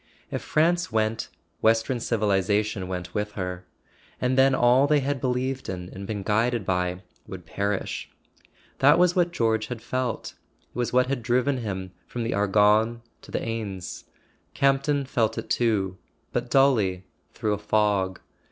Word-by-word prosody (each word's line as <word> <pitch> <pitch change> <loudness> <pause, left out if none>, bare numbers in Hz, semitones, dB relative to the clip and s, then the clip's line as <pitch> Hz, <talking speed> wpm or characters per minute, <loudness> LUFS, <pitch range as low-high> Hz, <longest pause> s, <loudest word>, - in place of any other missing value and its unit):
If - - -2
France 170 -1 +1
went, 110 0 0 0.3
western 115 +3 +2
civilization 105 -2 0
went 90 -1 -5
with 105 0 -2
her; 90 -2 -5 0.5
and 125 +1 +1
then 135 0 +5
all 125 +3 +4
they 150 -1 +3
had 135 -1 -2
believed 130 +1 -1
in 90 -1 -5
and 95 +1 -7
been 105 -2 -3
guided 110 +1 +1
by 90 0 -1 0.2
would 90 -2 -8
perish. 100 +4 -3 0.7
That 145 +4 +6
was 180 0 +4
what 175 -1 +2
George 110 -7 +1
had 125 -2 -5
felt; 125 0 -3 0.4
it - - -34
was 120 -1 -1
what 125 0 +4
had 135 -1 -2
driven 125 +4 +1
him 95 -5 -4 0.2
from 120 - -4
the 115 - -1
Argonne 105 +3 +3 0.2
to - - -16
the - - -2
Aisne. 105 -6 -5 0.5
Campton 140 +1 +2
felt 115 -3 0
it - - -5
too; 100 -6 +1 0.3
but - - -2
dully, 110 -9 +3 0.3
through 105 - 0
a 105 - -3
fog. 105 -3 +1
110 Hz, 155 wpm, -25 LUFS, 100-130 Hz, 0.7 s, That